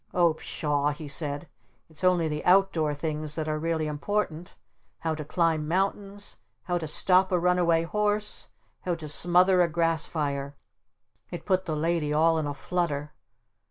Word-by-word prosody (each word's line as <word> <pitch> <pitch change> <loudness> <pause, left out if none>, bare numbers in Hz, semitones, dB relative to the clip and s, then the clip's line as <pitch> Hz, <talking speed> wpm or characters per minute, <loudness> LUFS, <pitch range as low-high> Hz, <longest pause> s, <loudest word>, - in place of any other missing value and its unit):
"Oh 170 -2 +4
pshaw!" 150 -2 -1
he 150 +1 -8
said. 145 +1 -2 0.4
"It's 160 +2 -10
only 180 -3 +3
the 150 -1 -3
outdoor 180 -5 +3
things 150 0 -4
that 155 -1 -3
are 155 0 -1
really 160 0 -1
important, 165 +2 -3 0.5
how 160 -1 -1
to 155 -1 -5
climb 160 0 0
mountains, 195 +3 -2 0.2
how 175 -2 -1
to 160 - -5
stop 185 +5 +3
a 180 - +3
runaway 175 -2 +2
horse, 210 +3 -1 0.3
how 175 -2 -2
to 160 -2 -8
smother 180 +4 +4
a 175 - +4
grass 165 -1 +1
fire!" 140 -2 -3 0.7
It 175 - -7
put 185 -1 +1
the 160 -3 -2
Lady 160 -1 0
all 160 +2 +3
in 155 - -2
a 145 - -3
flutter. 150 -4 -2
165 Hz, 160 wpm, -27 LUFS, 150-180 Hz, 0.7 s, Oh